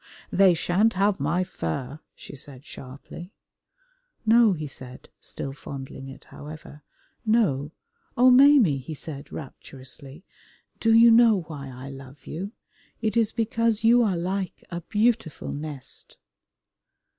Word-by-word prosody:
"They 190 -3 +5
sha'n't 195 +7 +2
have 195 0 +1
my 160 +6 +1
fur," 130 - -5 0.2
she - - -11
said 135 -1 -11
sharply. 140 +8 -10 0.9
"No," 225 -1 +6
he 155 -3 -5
said, 130 -2 -9
still 135 - -6
fondling 135 -1 -8
it, 135 0 -11
however, 150 0 -11 0.4
"no! 200 - +2 0.5
Oh, 255 +1 +7
Maimie," 255 - +6
he 145 +5 -7
said 145 -1 -8
rapturously, 135 +2 -10 0.5
"do 225 - +2
you 230 +1 +8
know 225 -4 +6
why 150 -4 -8
I 130 +2 -9
love 135 +1 -12
you? 190 +6 -5 0.5
It 220 -1 -1
is 225 -2 +2
because 230 -1 0
you 235 +2 +6
are 200 -6 +1
like 185 +2 -3
a 170 0 -4
beautiful 215 - 0
nest." 145 -2 -7
170 Hz, 130 wpm, -25 LUFS, 140-220 Hz, 0.9 s, you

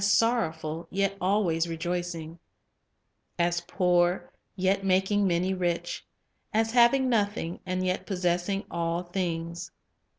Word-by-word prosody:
sorrowful, 170 -8 +1
yet 195 0 0
ahvay 180 -4 +1
rejoicing; 170 -1 -4 1.0
as 175 0 +1
poor, 180 -1 +2 0.2
yet 190 +1 +1
making 195 +2 +2
main' 180 +2 +1
rich; 175 -1 -1 0.5
as 225 +1 +1
having 245 +2 +5
nothing, 205 -7 0
and 185 0 -1
yet 185 0 -1
possessing 180 +1 0
all 170 0 -1
things."' 175 -1 -3
180 Hz, 105 wpm, -28 LUFS, 170-195 Hz, 1.0 s, having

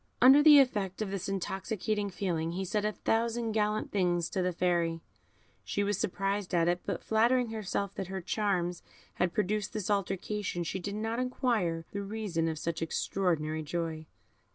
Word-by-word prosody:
Under 265 +3 +8
the 300 -1 +9
effect 215 -7 +2
of 195 - -5
this 195 -1 -3
intoxicating 200 +2 -2
feeling, 170 -4 -2
he 190 +2 -2
said 210 +3 -1
a 215 - +1
thousand 230 +1 0
gallant 215 0 0
things 175 -4 +1
to 190 - 0
the 180 0 +1
Fairy. 170 -2 +1 0.6
She 205 - -1
was 205 -1 0
surprised 195 0 -1
at 170 -1 +3
it, 175 0 +1
but - - -2
flattering 235 +2 +3
herself 200 -2 -2
that 190 - -4
her 190 0 -4
charms 180 -2 -1 0.4
had 180 -1 +1
produced 210 +3 -1
this 210 -2 -2
alteration, 195 -1 -1
she 180 +3 -3
did 200 +3 -4
not 225 +2 -2
inquire 225 -10 0
the 200 - -3
reason 200 -5 -2
of 160 -1 -2
such 165 +1 -3
extraordinary 160 -2 -1
joy. 160 0 -3
195 Hz, 170 wpm, -30 LUFS, 175-215 Hz, 0.6 s, the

